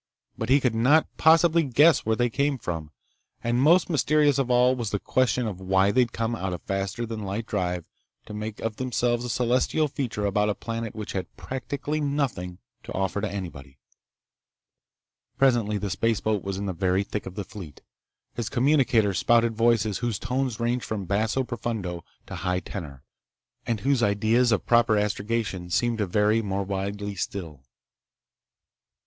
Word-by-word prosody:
But 110 - -4
he 135 +2 +6
could 125 -4 +1
not 130 +8 +4
possibly 165 +1 +5
guess 150 0 +4
where 110 - +3
they 120 +1 +1
came 140 +2 0
from. 80 -8 -5 0.5
And 120 +1 +1
most 170 +6 +5
mysterious 145 -1 +2
of 130 -2 0
all 125 +1 +4
was 120 -4 -3
the 100 - -1
question 125 +3 +1
of 95 -4 -5
why 95 +1 +3
they'd 125 0 +2
come 115 +1 -2
out 95 -4 -3
of 90 - -7
faster 95 +4 -2
than 115 -1 -5
light 100 +3 -3
drive 90 -5 -2 0.4
to - - -9
make 105 0 -5
of 115 -1 -3
themselves 120 -1 0
a 125 - -4
celestial 125 +6 +1
feature 125 -7 -3
about 105 +1 +1
a 105 - 0
planet 115 -1 -5
which 110 -2 -5
had 95 - -5
practically 140 +4 -4
nothing 135 -12 -2 0.2
to - - -8
offer 95 +1 -1
to 110 - -1
anybody. 75 -9 -7 1.6
Presently 120 -6 +3
the 100 -1 -3
spaceboat 110 -1 0
was 95 -1 -3
in 100 - -3
the 95 - -2
very 95 +2 +1
thick 105 0 -5
of 95 - -8
the 100 - -3
fleet. 90 -9 -11 0.5
His 120 -3 -3
communicator 120 -6 +3
spouted 115 +4 +3
voices 115 -3 +2
whose 120 -4 -1
tones 125 0 -2
ranged 120 +1 0
from 105 -3 -4
basso 110 +7 0
profundo 110 -8 -4 0.2
to - - -7
high 90 0 -1
tenor, 70 -9 -8 0.6
and 115 -4 -1
whose 135 0 +2
ideas 110 +4 +2
of 110 - +1
proper 115 -2 +4
astrogation 105 -3 -2
seemed 120 +5 0
to 105 - 0
vary 105 +4 +2
more 100 -2 -2
widely 100 +1 -3
still. 85 -6 -5
110 Hz, 170 wpm, -26 LUFS, 100-125 Hz, 1.6 s, he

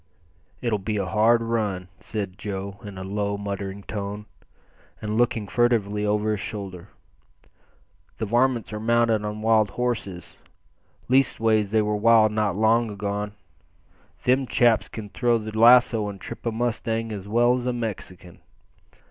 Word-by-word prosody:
"It'll 115 -4 0
be 105 +2 -2
a 100 - -1
hard 115 +4 +3
run," 105 -6 -2
said 100 -4 -5
Joe 100 -1 -5
in 100 -2 -8
a 95 - -5
low, 100 +1 -2
muttering 100 -1 -5
tone, 105 0 -5 0.7
and 105 0 -3
looking 115 -2 +1
furtively 105 -3 +1
over 105 +1 +1
his 105 - -1
shoulder. 95 -2 -6 1.3
"The 110 - -2
varmints 120 +1 +1
are 105 - -3
mounted 115 -1 +2
on 105 +1 -5
wild 110 -2 +4
horses 115 -8 -4 0.7
leastways 115 -5 +2
they 110 +1 +2
were 105 0 0
wild 110 0 +5
not 105 -3 0
long 110 +2 +3
agone. 105 0 -3 0.9
Them 130 +1 +2
chaps 120 -2 +3
can 105 -2 -8
throw 120 +2 +1
the 110 -1 -7
lasso 115 -2 +5
and 100 -1 -8
trip - - -7
a - - +1
mustang 115 -1 -2
as 100 -2 -6
well 120 +3 +3
as 125 0 -2
a 125 - 0
Mexican. 95 -6 -6
110 Hz, 150 wpm, -24 LUFS, 100-115 Hz, 1.3 s, wild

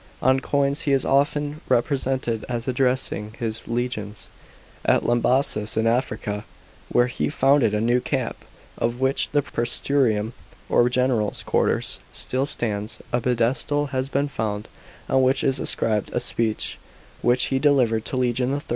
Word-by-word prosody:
On 130 0 +3
coins 140 +1 +1
he 140 - +1
is 135 - +2
often 145 +2 +1
represented 130 -2 0
as 120 -1 -3
addressing 125 -4 0
his 115 -1 -4
legions. 115 -3 -4 0.5
At - - +3
Lambassis 120 -3 +1
in 110 - +2
Africa, 110 -3 -1 0.5
where 120 - +4
he 75 -12 -2
founded 135 - +3
a - - +1
new 120 +3 +2
camp, - - -2 0.4
of 120 +1 -1
which 130 +1 +1
the 145 -1 +1
prseturium, 120 -3 0 0.4
or 120 - +4
general's 125 -4 0
quarters, - - 0
still 130 +2 -1
stands, 105 -5 -2 0.2
a 120 - +2
pedestal 125 +5 0
has 130 0 -1
been 140 +1 0
found, 105 -6 -3 0.4
on 130 - +3
which 130 +1 +2
is 135 -1 +1
inscribed 105 -3 0
a - - +2
speech 110 -2 -2 0.4
which 120 +1 +3
he 135 - +2
delivered 130 -6 +3
to 130 - -3
legion 125 +1 +1
III. 145 - -3
125 Hz, 145 wpm, -23 LUFS, 115-135 Hz, 0.5 s, where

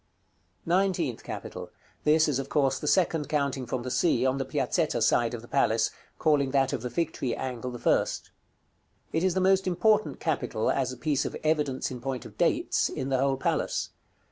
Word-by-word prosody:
§ - - -44
CXVI. - - -43
NINETEENTH 175 - +1
CAPITAL. - - -7 0.4
This 155 +1 +5
is, 140 -3 0
of 135 0 -5
course, 135 -3 +1
the 150 - -5
second 165 -3 +2
counting 140 -4 -1
from 120 +1 -3
the 125 - -4
Sea, 130 -6 +2
on 130 +1 +1
the 135 - -1
Piazzetta - - 0
side 120 0 +2
of 115 - -9
the - - -12
palace, 110 -1 +2 0.3
calling 145 -4 +2
that 135 -1 +2
of - - -2
the 125 - -4
Fig 165 +3 -1
tree 125 -3 -2
angle 125 -2 -4
the 120 - -6
first. - - 0 0.8
It 160 - +1
is 185 -2 +2
the - - +2
most 190 0 +3
important 210 +4 +2
capital, 140 -8 -1
as 130 -2 0
a 130 - -8
piece 145 +1 0
of - - -4
evidence 150 -5 0
in 125 -2 -7
point 130 -1 -4
of - - -11
dates, - - +1
in 130 - -4
the 130 -1 +1
whole 135 0 +1
palace. - - -1
135 Hz, 205 wpm, -28 LUFS, 130-160 Hz, 0.8 s, This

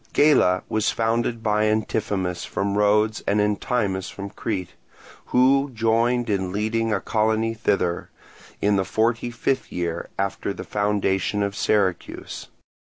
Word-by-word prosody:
Gela 145 -12 +4
was 110 -1 +1
founded 115 0 0
by 105 0 +2
Antiphemus 105 -4 -1
from 100 0 -2
Rhodes 105 +1 +2
and 105 - +2
Entimus 105 -2 0
from 100 0 -7
Crete, 95 -6 -4 0.5
who 135 +3 +3
joined 115 +2 +2
in 95 -3 -1
leading 110 +3 0
a 100 - +1
colony 110 +1 0
thither, 95 -6 -1 0.5
in 100 0 +3
the 95 - +2
forty 115 +4 0
fifth 130 +3 -2
year 85 -1 -3
after 100 0 -2
the - - -6
foundation 105 -1 0
of 100 0 -2
Syracuse. 95 -5 -1
105 Hz, 130 wpm, -23 LUFS, 100-115 Hz, 0.5 s, Gela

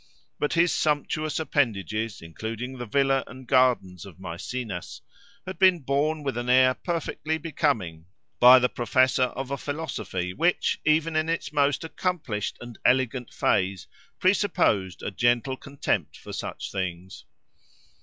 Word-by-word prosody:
But 150 - 0
his 170 0 +3
sumptuous 155 +1 0
appendages, 110 - -1
including 115 +9 -6
the 120 - -5
villa 135 +2 +2
and 130 0 -11
gardens 120 -9 +2
of 95 -4 -13
Maecenas, 95 +2 -6 0.4
had 185 -2 -7
been 185 -3 +5
borne 145 +3 0
with 135 -3 -2
an 120 +1 -3
air 130 0 +6
perfectly 160 0 -3
becoming, 135 - -2 0.3
by 125 +1 +9
the 125 0 +3
professor 130 +2 +2
of 135 0 -4
a 140 - -2
philosophy 145 - -4
which, 175 - +1
even 155 +1 +2
in 155 +1 +1
its 165 -2 -2
most 145 +1 +2
accomplished 160 - -3
and 120 -2 -10
elegant 125 -1 +1
phase, 95 -1 0 0.3
presupposed 180 - +1
a - - -3
gentle 120 +4 +1
contempt 140 +1 -3
for - - -10
such - - -5
things. 95 -1 -5
130 Hz, 135 wpm, -26 LUFS, 105-155 Hz, 0.4 s, by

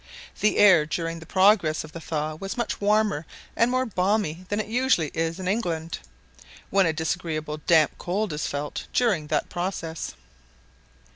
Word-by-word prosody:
The 215 - +2
air 180 -7 +6
during 165 +1 -3
the 160 - -12
progress 190 -5 +3
of 155 - -11
the 165 - -8
thaw 155 -1 -2
was 195 +9 -6
much 235 -3 -2
warmer 210 -5 +2 0.3
and 230 - +3
more 255 +1 +1
balmy 185 -4 -1
than 205 - -1
it 215 - -1
usually 235 - +1
is 165 +2 -2
in 185 - -4
England, 170 -6 -2 0.7
when 195 -3 +4
a - - +2
disagreeable 160 -1 -3
damp 160 -3 +5
cold 195 0 -2
is 150 - -2
felt 145 +1 -4
during 200 -12 +2
that 150 0 -1
process. 175 -2 -4
175 Hz, 160 wpm, -25 LUFS, 160-205 Hz, 0.7 s, air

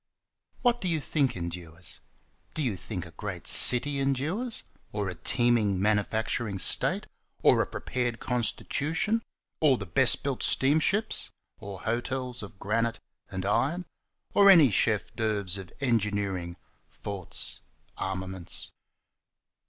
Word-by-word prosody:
What 240 -1 +2
do 185 - -2
you 165 -3 0
think 140 - -1
endures? 85 -1 -8 0.6
Do 155 - -1
you 120 -7 -1
think 90 0 -6
a 85 - -12
great 90 +1 -7
city 140 +3 +7
endures? 155 - -2 0.3
Or 105 -1 -3
a 90 - -4
teeming 115 -4 +1
manufacturing 105 +1 0
state? - - +3 0.4
or - - +5
a - - -2
prepared 120 -2 -3
constitution? 155 - -1 0.4
or 140 -5 +4
the 95 - -6
best 85 - +4
built - - -3
steamships? 160 +10 +2 0.3
Or 100 -2 -9
hotels 125 +2 -3
of 100 -1 -11
granite 115 +3 -1 0.3
and 95 -3 -5
iron? 135 - 0 0.5
or 200 -1 +6
any 160 - +7
chef 105 +1 0
d'oeuvres 100 -4 -1
of 95 -2 -10
engineering, 100 -8 -1 0.3
forts, 100 -4 -2 0.3
armaments? 95 -2 -5
110 Hz, 120 wpm, -27 LUFS, 95-135 Hz, 0.6 s, city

